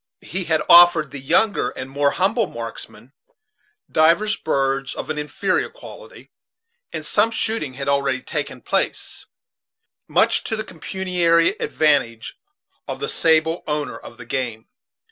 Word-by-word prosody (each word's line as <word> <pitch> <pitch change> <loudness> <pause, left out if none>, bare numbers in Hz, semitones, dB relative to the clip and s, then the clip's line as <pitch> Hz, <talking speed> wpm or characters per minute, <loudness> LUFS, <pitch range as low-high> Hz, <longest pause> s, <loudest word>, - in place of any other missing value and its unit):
He 185 +1 -4
had 160 -2 +1
offered 175 -1 +8
to 150 - -18
the 140 +1 -8
younger 205 +10 +1
and 130 - -7
more 140 +1 +1
humble 195 - +1
marks 115 -5 -7
men 120 +6 -18 0.8
divers 170 +7 +3
birds 135 -2 -1
of - - -5
an 150 - -3
inferior 150 0 -1
quality, - - -13 0.6
and - - -5
some 215 +2 +2
shooting 220 - -2
had 140 0 -5
already 140 -2 +1
taken - - -5
place, - - -2 0.8
much - - +2
to 225 - -2
the 215 - -4
pecuniary 175 -3 +1
advantage 140 -7 0 0.5
of - - -5
the 440 - -3
sable 160 - +2
owner 150 -1 -2
of - - -12
the 125 - -11
game. 120 -3 -4
155 Hz, 145 wpm, -21 LUFS, 135-185 Hz, 0.8 s, offered